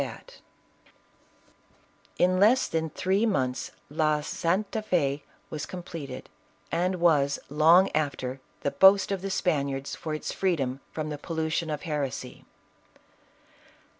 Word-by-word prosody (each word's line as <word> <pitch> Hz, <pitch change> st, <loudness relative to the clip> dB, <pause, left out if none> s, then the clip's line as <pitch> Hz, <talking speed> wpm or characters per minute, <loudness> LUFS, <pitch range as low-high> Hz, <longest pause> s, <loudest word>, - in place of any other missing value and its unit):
115 -, -, -5 dB
bat -, -, -27 dB
In 185 Hz, +1 st, +3 dB
less 225 Hz, +6 st, +5 dB
than 160 Hz, 0 st, -1 dB
three 190 Hz, +6 st, 0 dB
months, 130 Hz, -, 0 dB, 0.2 s
La 155 Hz, 0 st, +1 dB
Santa 190 Hz, +8 st, -1 dB
¥6 145 Hz, -9 st, 0 dB, 0.3 s
was 150 Hz, -2 st, -4 dB
com 180 Hz, -1 st, -7 dB
pleted, 160 Hz, -5 st, -7 dB, 0.5 s
and 180 Hz, +2 st, +1 dB
was, 150 Hz, -5 st, +3 dB
long 165 Hz, +6 st, +6 dB
after, 135 Hz, -4 st, -2 dB, 0.2 s
the 140 Hz, -, 0 dB
boast 195 Hz, +1 st, +6 dB
of 195 Hz, -2 st, -1 dB
the 195 Hz, -, -3 dB
Spaniards, 140 Hz, -7 st, -1 dB
for 155 Hz, -2 st, -4 dB
its 155 Hz, -, -4 dB
freedom 140 Hz, -9 st, -1 dB
from 155 Hz, -1 st, -4 dB
the 150 Hz, -1 st, -5 dB
pollution 160 Hz, +1 st, -2 dB
of 150 Hz, -1 st, -3 dB
heresy. 140 Hz, -5 st, -4 dB
160 Hz, 130 wpm, -27 LUFS, 145-185 Hz, 0.5 s, long